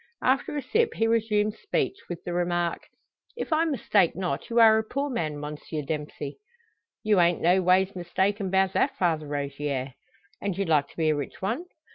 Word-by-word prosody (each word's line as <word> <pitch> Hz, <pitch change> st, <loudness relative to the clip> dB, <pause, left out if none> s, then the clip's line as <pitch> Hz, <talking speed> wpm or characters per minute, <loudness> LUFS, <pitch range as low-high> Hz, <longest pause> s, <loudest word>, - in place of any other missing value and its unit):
After 270 Hz, +3 st, +1 dB
a 285 Hz, -, -3 dB
sip, 455 Hz, -, +1 dB
he 225 Hz, -, +1 dB
resumes 215 Hz, -2 st, +1 dB
speech 405 Hz, -, -1 dB
with 175 Hz, -2 st, -6 dB
the 175 Hz, -, -4 dB
remark: 175 Hz, -1 st, -1 dB, 0.5 s
"If 345 Hz, -, -2 dB
I 320 Hz, +1 st, +3 dB
mistake 210 Hz, -, +2 dB
not, 180 Hz, 0 st, -3 dB
you 235 Hz, 0 st, +2 dB
are 220 Hz, -1 st, +7 dB
a -, -, -1 dB
poor 275 Hz, +5 st, -3 dB
man, 155 Hz, -10 st, -2 dB
Monsieur 150 Hz, +1 st, -5 dB
Dempsey?" 150 Hz, -1 st, -5 dB, 0.6 s
"You 210 Hz, -3 st, +3 dB
ain't 175 Hz, 0 st, +3 dB
no 180 Hz, +3 st, +4 dB
ways 185 Hz, +2 st, +3 dB
mistaken 190 Hz, +3 st, -1 dB
'bout 190 Hz, 0 st, +2 dB
that, -, -, +1 dB
Father 160 Hz, -4 st, 0 dB
Rogier." 140 Hz, -2 st, -3 dB, 0.5 s
"And 200 Hz, -3 st, -2 dB
you'd 195 Hz, -2 st, -1 dB
like 150 Hz, -3 st, +3 dB
to -, -, -20 dB
be 160 Hz, -2 st, +2 dB
a -, -, +1 dB
rich 145 Hz, -2 st, -5 dB
one?" 230 Hz, -, -2 dB
185 Hz, 185 wpm, -26 LUFS, 155-220 Hz, 0.6 s, are